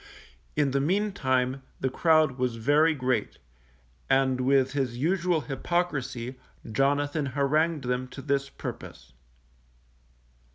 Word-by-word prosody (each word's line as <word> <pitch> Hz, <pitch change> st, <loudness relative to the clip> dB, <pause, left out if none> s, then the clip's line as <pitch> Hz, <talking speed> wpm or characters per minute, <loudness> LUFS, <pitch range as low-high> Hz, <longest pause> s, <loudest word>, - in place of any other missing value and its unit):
In 145 Hz, -2 st, +2 dB
the 140 Hz, +1 st, +1 dB
meantime 135 Hz, -8 st, 0 dB, 0.2 s
the 130 Hz, -, -1 dB
crowd 155 Hz, -3 st, +3 dB
was 125 Hz, -2 st, 0 dB
very 145 Hz, +7 st, +3 dB
great, 125 Hz, -5 st, -1 dB, 0.7 s
and, 130 Hz, -1 st, +2 dB
with 135 Hz, 0 st, +3 dB
his 130 Hz, -5 st, -2 dB
usual 170 Hz, +3 st, +1 dB
hypocrisy, 135 Hz, -5 st, -2 dB, 0.3 s
Jonathan 145 Hz, +4 st, +1 dB
harangued 145 Hz, +3 st, +1 dB
them 125 Hz, +1 st, -1 dB
to 135 Hz, +1 st, -10 dB
this 140 Hz, -1 st, 0 dB
purpose. -, -, -8 dB
140 Hz, 110 wpm, -27 LUFS, 130-155 Hz, 0.7 s, crowd